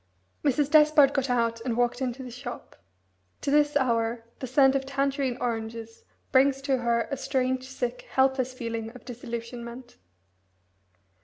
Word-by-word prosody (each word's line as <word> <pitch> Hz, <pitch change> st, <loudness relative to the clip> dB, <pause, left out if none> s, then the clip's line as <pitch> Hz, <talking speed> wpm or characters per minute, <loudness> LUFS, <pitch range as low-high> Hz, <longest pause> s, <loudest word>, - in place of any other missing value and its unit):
Mrs. 290 Hz, 0 st, +1 dB
Despard 300 Hz, -2 st, +6 dB
got 270 Hz, -1 st, 0 dB
out 230 Hz, -2 st, +1 dB
and 235 Hz, -1 st, -2 dB
walked 245 Hz, +1 st, +1 dB
into 260 Hz, 0 st, -3 dB
the 250 Hz, -, -8 dB
shop. 245 Hz, 0 st, -8 dB, 0.7 s
To 280 Hz, -, -1 dB
this 295 Hz, 0 st, +3 dB
hour 230 Hz, -3 st, 0 dB, 0.2 s
the 260 Hz, -, -4 dB
scent 270 Hz, +1 st, +5 dB
of 275 Hz, -1 st, 0 dB
Tangerine 275 Hz, -1 st, -1 dB
oranges 225 Hz, -1 st, -4 dB, 0.3 s
brings 270 Hz, +1 st, +4 dB
to 270 Hz, -2 st, +1 dB
her 235 Hz, -1 st, 0 dB
a 275 Hz, -, -1 dB
strange, 260 Hz, -1 st, -1 dB
sick, 250 Hz, -2 st, -4 dB
helpless 265 Hz, -1 st, +2 dB
feeling 230 Hz, -3 st, -4 dB
of 250 Hz, -, -13 dB
disillusionment. 235 Hz, 0 st, -7 dB
255 Hz, 145 wpm, -27 LUFS, 235-275 Hz, 0.7 s, Despard